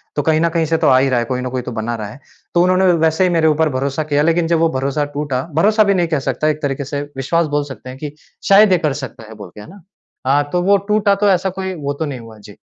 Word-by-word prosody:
तो 145 - +1
कहीं 155 +2 +1
न 170 - +2
कहीं 165 -1 0
से 165 +1 0
तो - - +1
आ 130 - +5
ही 135 +1 +2
रहा 125 -2 +1
है, 120 - -1
कोई 125 +1 -3
न 125 - -4
कोई 130 0 -3
तो 125 - -7
बना 120 +2 -3
रहा 110 -2 -6
है। 110 - -12 0.3
तो 175 - +3
उन्होंने 185 +1 +3
व - - +2
वैसे 160 +2 +2
ही 185 - +3
मेरे 165 -2 +2
ऊपर 155 0 +2
भरोसा 135 +2 -2
किया 145 0 +3
लेकिन 165 +1 +1
जब 165 -1 +1
वो 165 0 +3
भरोसा 140 +2 -1
टूटा 145 -3 -2
भरोसा 215 +6 +4
भी 200 -1 +2
नहीं 175 -3 +1
कह 160 -3 0
सकता। 135 +4 -1
एक 155 0 -1
तरीके 140 -1 -2
से 140 +1 -4 0.2
विश्वास 165 +6 0
बोल 145 - +1
सकते 130 +2 -12
हैं 130 - -9
कि 150 0 -5 0.4
शायद 200 +1 +6
ये 185 - +5
कर 145 - -1
सकता 115 -3 -9
है 110 - -11
बोलके 100 -2 -12
है 105 - -12
ना? 200 +1 -14 0.5
हाँ, 145 +2 +3
तो 180 - 0
वो 200 +2 +4
टूटा 210 -1 +2
तो 205 +1 +1
ऐसा 190 0 +2
कोई 190 0 -3
वो 140 0 -1
तो 160 - -1
नहीं 140 -4 -5
हुआ। 115 -1 -13
जी। 105 -1 -14
150 Hz, 300 wpm, -17 LUFS, 130-175 Hz, 0.5 s, शायद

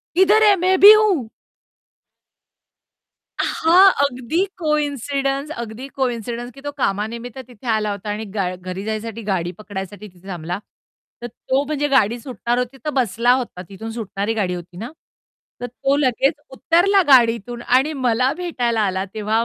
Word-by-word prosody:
किधर 405 +4 +5
है 415 -2 +6
मैं 375 0 +3
भी 410 +2 +11
हूं. 405 - +2 2.1
अ, - - +1 0.2
हां, 370 +4 +7
अगदी 280 +6 -1
कॉइन्सिडन्स 285 -2 -1
अगदी 230 +4 -8
कॉइन्सिडन्स 240 -1 -3
की 275 - -15
तो 290 +1 -5
कामानिमित्त 230 +2 -3
तिथे 245 0 -13
आला 215 -2 0
होता 205 +1 -6
आणि 210 +2 -3
गा 185 -2 -1
घरी 185 +1 -7
जाण्यासाठी 220 +1 -4
गाडी 175 -2 -1
पकडण्यासाठी 205 0 -8
तिथे 180 0 -18
थांबला. 175 0 -5 0.6
तर 240 - -5
तो 260 +4 -2
म्हणजे 295 0 -1
गाडी 240 -4 +2
सुटणार 240 -1 -3
होती 250 +2 -3
तर - - 0
बसला 245 -3 +1
होता, 250 -8 -3
तिथून 220 +3 -8
सुटणारी 220 -1 -3
गाडी 200 -5 -1
होती 175 0 -10
ना, 230 +7 -6 0.7
तर 245 - -3
तो 270 +3 -1
लगेच 270 +1 +2 0.2
उतरला 350 +8 +3
गाडीतून 240 -3 +3
आणि 260 +6 +2
मला 255 -1 +1
भेटायला 245 -11 -1
आला 190 -2 0
तेव्हा 220 +1 0
240 Hz, 150 wpm, -20 LUFS, 210-280 Hz, 2.1 s, भी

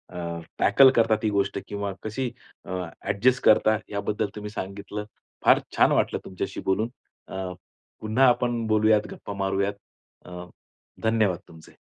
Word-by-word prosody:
अ, 85 -1 -4 0.2
tackle 130 +7 +7
करतात 115 -2 +4
ती 110 - +2
गोष्ट 100 -1 0
किंवा 100 -1 -3
कशी 120 +4 -2 0.4
अ, - - -12 0.3
ॲडजस्ट 105 +6 +1
करता, 110 0 +5
याबद्दल 100 0 -2
तुम्ही 105 0 -6
सांगितलं. 100 +1 -6 0.4
फार - - +7 0.2
छान - - +5
वाटलं - - +1
तुमच्याशी 95 - -5
बोलून. 105 +4 +1 0.4
अ, 95 -1 -5 0.5
पुन्हा 110 +5 +3
आपण 120 -1 +1
बोलूयात, 110 0 +4
गप्पा 100 - -7
मारूयात 100 +1 0 0.5
अ, 90 0 -8 0.6
धन्यवाद 110 -5 +2
तुमचे. 80 -1 -15
105 Hz, 135 wpm, -25 LUFS, 95-110 Hz, 0.6 s, tackle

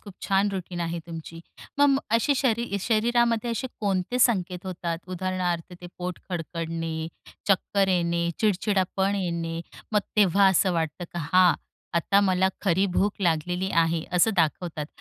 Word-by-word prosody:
खूप 200 -3 -12
छान 195 +1 +2
रूटीन 180 -2 -5
आहे 170 0 -2
तुमची. 165 0 -8 0.4
मग 285 -1 +5
अशी 230 +5 +3
शरी 235 -5 0
शरीरामध्ये 235 +2 +2
असे 230 +3 -2
कोणते 200 +3 0
संकेत 185 -7 +1
होतात? 170 -2 -3
उदाहरणार्थ 180 -2 -2
ते 175 - -8
पोट 180 0 -4
खडकडणे, 165 -1 -3 0.4
चक्कर 195 0 +2
येणे, 170 -2 +1
चिडचिडापण 195 -1 +1
येणे 170 -3 -2 0.3
मग 210 - +4 0.2
तेव्हा 200 -1 +5
असं 190 0 +3
वाटतं 165 0 -2
की 175 - -7
हा, 185 -1 +6 0.4
आता 195 +4 +3
मला 190 -1 +3
खरी 190 0 +2
भूक 205 +1 +2
लागलेली 180 +2 0
आहे 165 0 0
असं 180 +5 +4
दाखवतात 160 -2 0
185 Hz, 140 wpm, -26 LUFS, 170-200 Hz, 0.4 s, हा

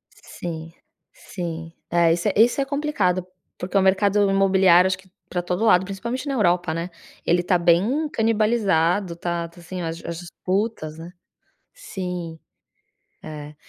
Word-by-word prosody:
Sim, 165 -1 -8 0.4
sim. 165 -2 -7 0.2
É 170 -1 +4
esse 170 - 0
é, - - -2
esse 235 +6 +4
é - - 0
complicado, 270 - 0 0.3
porque 185 +2 -2
o - - +5
mercado 200 +1 +3
imobiliário 190 -2 +5
acho 190 0 -1
que 190 -1 -20 0.2
pra 175 - -1
todo 180 +4 -2
lado, 190 -4 +5
principalmente 235 +8 -5
na 275 - -1
Europa, 175 -7 +1
né, 170 +2 -3 0.4
ele 175 +1 +2
tá 180 0 +2
bem 200 - +2
canibalizado, 210 - +1
tá 170 -1 -3
tá, 170 +1 -17
assim, 180 +1 -7
as 165 0 -5
as 170 0 -5
disputas, 180 -2 -3
né. 170 +2 -9 0.6
Sim. 180 - -6 0.9
É. 150 -1 -8
180 Hz, 150 wpm, -23 LUFS, 170-205 Hz, 0.9 s, o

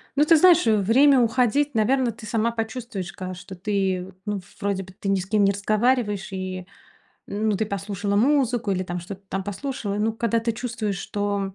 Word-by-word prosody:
Ну, 290 - +4
ты 325 +1 +6
знаешь, 355 -1 +6
время 230 +6 +5
уходить, 250 +4 +2
наверно, 240 +3 +2
ты 225 0 -12
сама 225 +2 0
почувствуешь, 225 -4 -5
ка 185 0 -6
что 180 +1 -10
ты, 190 -1 -1
ну, 205 -1 -2 0.2
вроде 195 -1 -1
бы 185 - -14
ты 195 - -3
ни 195 - +2
с 180 - -4
кем 210 +1 +2
не 200 - +4
разговариваешь, 210 0 0
и, 185 -1 -5 0.6
ну, 215 +1 -1
ты 220 - -1
послушала 200 0 -2
музыку 245 -3 +2
или, 185 0 -1
там, 180 -1 -4
что-то 190 +3 -9
там 195 +1 -2
послушала. 205 0 -4
Ну, 215 +1 +1
когда 230 0 0
ты 230 +1 -1
чувствуешь, 220 -4 -3
что 200 -2 -2
210 Hz, 185 wpm, -24 LUFS, 195-235 Hz, 0.6 s, ты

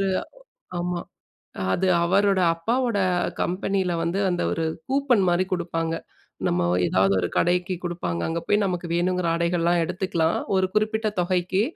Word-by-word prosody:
ஒரு 195 - +1 0.7
ஆமா. 175 0 -2 0.7
அது 190 - +1 0.2
அவரோட 195 +1 +3
அப்பாவோட 230 +5 0 0.4
கம்பெனியில 185 0 -1
வந்து 170 +4 -1
அந்த 175 - -1
ஒரு 165 - -1 0.2
கூப்பன் 265 -7 +2
மாதிரி 175 +1 +2
குடுப்பாங்க. 165 -2 -1 0.5
நம்ம 85 0 +1 0.2
ஏதாவது 95 +2 +3
ஒரு 90 - -1
கடைக்கு 180 +1 +1
குடுப்பாங்க. 165 - -3
அங்கே 165 +1 -2
போய் 205 0 +3
நமக்கு 180 -2 -2
வேணுங்கிற 180 0 +1
ஆடைகள்லாம் 170 0 +1
எடுத்துக்கலாம், 175 -2 0 0.2
ஒரு 190 - +3
குறிப்பிட்ட 220 +1 +1
தொகைக்கு. 185 +2 +1
180 Hz, 135 wpm, -24 LUFS, 170-195 Hz, 0.7 s, அவரோட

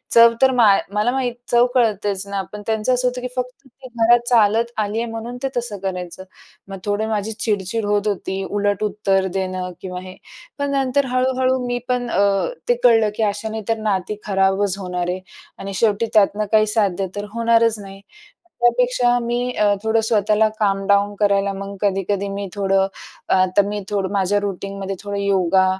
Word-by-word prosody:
चव 230 0 +8
तर 265 0 +6
मा 230 - +7 0.3
मला 210 +4 +1
माहीत 255 -2 -1 0.2
चव 240 0 +5
कळतेच 205 -4 +1
ना 200 -1 -2
पण 210 - -6
त्यांचं 220 +3 +1
असं 250 0 +1
होतं 250 0 -3
की 250 - -3
फक्त 250 +2 -5
ती 260 +1 -14
घरात 235 +1 +5
चालत 230 0 +3
आली 210 0 -1
आहे 235 - -3
म्हणून 230 +2 -6
ते - - +1
तसं 235 -4 -3
करायचं. 180 -1 -5 0.4
मग 195 0 -7
थोडं 205 +1 -1
माझी 215 0 -2
चिड-चिड 215 -1 -2
होत 205 0 0
होती, 195 -1 -2
उलट 205 0 0
उत्तर 195 -2 +1
देणं 185 -1 -3
किंवा 180 -1 -5
हे. 185 0 -10 0.4
पण 285 0 -1
नंतर 275 0 +1
हळू-हळू 260 0 +1
मी 245 0 -1
पण 250 -1 -1
अ, 195 -3 +2 0.2
ते 245 - +5
कळलं 225 -3 +5
की 225 - -1
अशाने 220 +1 -5
तर 225 - +1
नाती 210 -1 -2
खराबच 195 0 +1
होणार 180 -2 -3
आहे 180 +1 -2 0.4
आणि 195 0 -6
शेवटी 210 +2 +1
त्यातनं 210 0 +3
काही 215 -1 +4
साध्य 195 -3 +1
तर 205 0 -4
होणारच 230 0 +3
नाही. 195 -1 -10 0.6
त्यापेक्षा 245 0 +3
मी 240 +1 -2
अ, 210 -4 +2
थोडं 220 0 +2
स्वतःला 215 0 +3
काम 195 -2 +1
डाऊन 200 0 +3
करायला 200 -1 +2
मग 200 +1 -6
कधी-कधी 200 0 0
मी 200 0 -4
थोडं 195 -1 +1 0.4
अ, 185 0 +4
तर - - +8
मी 205 0 -3
थोडं 195 -2 -1
माझ्या 200 +1 +1
रूटीनमध्ये 195 0 -4
थोडं 205 0 -4
योगा 190 -2 +2
205 Hz, 180 wpm, -20 LUFS, 195-235 Hz, 0.6 s, चव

